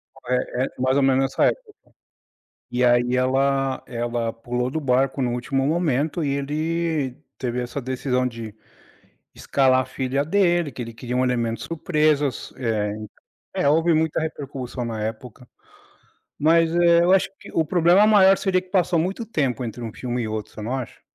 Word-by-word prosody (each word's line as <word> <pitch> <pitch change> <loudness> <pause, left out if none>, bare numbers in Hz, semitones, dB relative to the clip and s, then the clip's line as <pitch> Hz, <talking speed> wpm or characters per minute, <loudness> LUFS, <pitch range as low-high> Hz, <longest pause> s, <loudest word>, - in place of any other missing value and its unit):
O - - -16
eh-eh, 125 +1 0
mais 130 +2 +2
ou 140 - +3
menos 135 0 +3
nessa 135 - +1
época. 455 -4 -1 1.0
E 125 +1 +1
aí 120 +1 +3
ela 135 +1 +1
ela 120 -1 -2
pulou 125 +2 -3
do 160 - -2
barco 135 0 +1
no 120 -1 0
último 135 +2 -1
momento, 155 0 0
e - - 0
ele 150 0 -1 0.2
teve 125 -1 -2
essa 125 +3 -4
decisão 130 0 -1
de 115 -3 -6 0.8
escalar 130 -2 +2
a 130 - -2
filha 135 +2 -2
dele, 175 -3 +2
que 125 - -9
ele 115 - -7
queria 125 +1 -4
um 130 - +2
elemento 120 -2 -1
surpresas, 150 -4 0
é 110 -4 -1 0.6
é, - - +2
houve 165 +3 +3
muita 160 0 +1
repercussão 135 -5 -5
na 115 -2 -4
época. 115 +2 -7 0.9
Mas 165 +2 +3
é, 170 -1 +5
eu 180 - +3
acho 190 0 +4
que - - -12
o 160 - +2
problema 175 +5 +4
maior 195 -2 +6
seria 185 -2 +1
que 185 - -21
passou 180 -2 +2
muito 190 +8 -1
tempo 135 - -1
entre 115 +1 -7
um 115 - -5
filme 125 0 -3
e 110 - -3
outro, 110 -1 -5
você 110 - -8
não 115 +5 -3
acha? 130 -3 -7
135 Hz, 175 wpm, -23 LUFS, 125-160 Hz, 1.0 s, maior